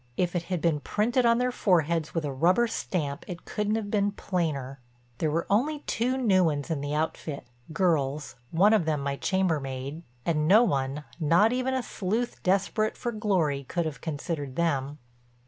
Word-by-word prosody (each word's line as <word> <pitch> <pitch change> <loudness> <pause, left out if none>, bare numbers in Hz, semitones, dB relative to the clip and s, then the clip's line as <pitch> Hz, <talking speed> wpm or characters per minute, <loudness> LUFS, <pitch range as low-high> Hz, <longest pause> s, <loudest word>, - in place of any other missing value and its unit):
If 180 0 0
it 175 - +1
had 180 -4 -1
been 165 -3 +2
printed 235 - +1
on 235 0 +4
their 250 +1 +1
foreheads 170 -7 +1
with 165 -2 0
a 140 - -3
rubber 180 - +3
stamp 150 -10 -3
it 175 -2 -7
couldn't 210 +1 -1
have 210 -2 -3
been 205 -1 +2
plainer. 150 -9 -2 0.4
There 155 - +1
were 165 +3 0
only 285 +9 +1
two 250 0 -1
new 200 -8 +3
ones 145 -1 -1
in 150 -3 -1
the 145 +1 -2
outfit—girls, 150 0 -2 0.2
one 200 +6 +4
of 210 -7 +3
them 155 -3 0
my 140 0 -1
chambermaid—and 150 -4 -2
no 210 +7 +7
one, 140 - -1 0.2
not 170 +9 +4
even 255 +1 0
a 260 - -1
sleuth 220 +4 -2
desperate 200 +3 +1
for 240 - -2
glory, 185 -11 0
could 170 +5 -2
have 155 -2 -5
considered 145 -3 -4
them. 145 -4 0
170 Hz, 170 wpm, -27 LUFS, 145-210 Hz, 0.4 s, no